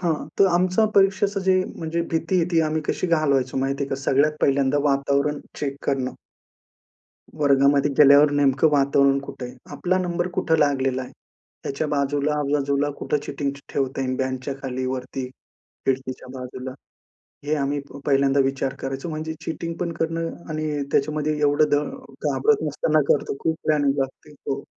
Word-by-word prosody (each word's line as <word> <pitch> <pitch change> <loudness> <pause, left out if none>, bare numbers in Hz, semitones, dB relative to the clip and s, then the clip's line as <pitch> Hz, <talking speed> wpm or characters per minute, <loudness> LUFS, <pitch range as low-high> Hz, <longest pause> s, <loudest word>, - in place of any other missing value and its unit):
हां. 165 -5 -1
तर 195 - +6
आमचं 185 +4 +3
परीक्षेचं 200 +1 +3
जे 190 0 +3 0.2
म्हणजे 165 +1 -2
भीती 165 +3 0
आहे, 175 - +3
ती 165 -2 +3
आम्ही 155 0 -1
कशी - - 0
घालवायचो 140 -6 +1
माहिती 135 +1 -1
आहे 140 - -3
का, - - -1
सगळ्यात 145 +3 +2
पहिल्यांदा 140 0 +2
वातावरण 140 +1 +1 0.2
चेक 140 -2 -2
करणं. 130 -2 0 1.3
वर्गामध्ये 140 0 +4
गेल्यावर 145 0 +7
नेमकं 140 +1 +3
वातावरण 140 -1 +3
कुठे 135 -2 -8
आहे? 125 - -11 0.2
आपला 185 +1 0
नंबर 175 -1 -1
कुठे 160 -1 +2
लागलेला 130 -2 +1
आहे. - - -10 0.5
त्याच्या 140 +3 -2
बाजूला, 145 +1 0
आजूबाजूला 140 0 0
कुठे 150 - 0
चीटिंग 140 0 -2 0.2
ठेवता 135 -1 -1
येईल, 130 0 -1
बेंचच्या 130 +1 -2
खाली, 130 -1 -3
वरती, 130 0 -4 0.6
खिडकीच्या 130 -1 -2
बाजूला. 125 +1 -6 0.8
हे 150 +1 +1
आम्ही 145 0 -1 0.3
पहिल्यांदा 140 -1 +3
विचार 135 0 -1
करायचो. 135 +5 -4
म्हणजे 155 0 -4
चीटिंग 165 +1 -4
पण 170 -1 -1
करणं 165 +1 -2 0.2
आणि 155 -1 -2
त्याच्यामध्ये 150 +1 0
एवढं 145 +1 +3
ध 145 - +4 0.5
घाबरत 440 -1 +2
नसताना - - +1
करतो, 430 -3 0
खूप 160 0 +1
प्लॅनिंग 145 -2 +2
लागते. 135 +3 -4 0.2
हो. 140 0 -2
145 Hz, 155 wpm, -23 LUFS, 135-160 Hz, 1.3 s, गेल्यावर